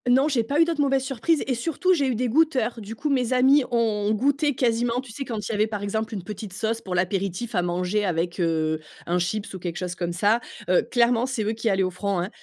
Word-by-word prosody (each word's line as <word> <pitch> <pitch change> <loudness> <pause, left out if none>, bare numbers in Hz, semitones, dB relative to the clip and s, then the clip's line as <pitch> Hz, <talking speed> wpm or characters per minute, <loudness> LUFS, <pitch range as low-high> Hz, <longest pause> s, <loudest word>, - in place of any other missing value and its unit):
Non, 265 +4 +5
j'ai 265 -6 +1
pas 280 +7 -1
eu 330 - +7
d'autres 330 -3 -1
mauvaises 270 -2 +2
surprises 270 +4 0
et, 265 - 0
surtout, 330 +9 +1
j'ai 285 -6 +1
eu 255 - 0
des 250 +3 0
goûteurs. 255 -4 +2
Du 215 +2 -7
coup, 295 +6 -2
mes 255 -2 +1
amis 265 +3 +5
ont 220 -4 +1
goûté 285 +4 +1
quasiment 235 0 +1
tu 260 -3 -8
sais, 275 +5 -5
quand 230 -4 -4
il - - -3
y - - -2
avait, 210 +1 +2
par 210 -2 -5
exemple, 220 +2 -2
une 190 - -5
petite 205 0 -7
sauce 225 +3 -2
pour 185 -2 -4
l'apéritif 190 +4 -1
à 180 - +2
manger 180 +4 0
avec, 175 -1 -1
heu, 160 -2 +1 0.3
un 175 +1 0
chips 200 +4 -2
ou 190 - -6
quelque 175 -1 -4
chose 180 -1 -3
comme 175 -1 -3
ça, 205 +6 +2 0.3
heu, 180 - +5
clairement, 240 0 +3
c'est 250 -4 -2
eux 210 - 0
qui 225 0 -1
allaient 190 -1 +2
au 185 - -1
front, 195 +1 -2
hein, 175 +2 -2
220 Hz, 255 wpm, -24 LUFS, 190-255 Hz, 0.3 s, eu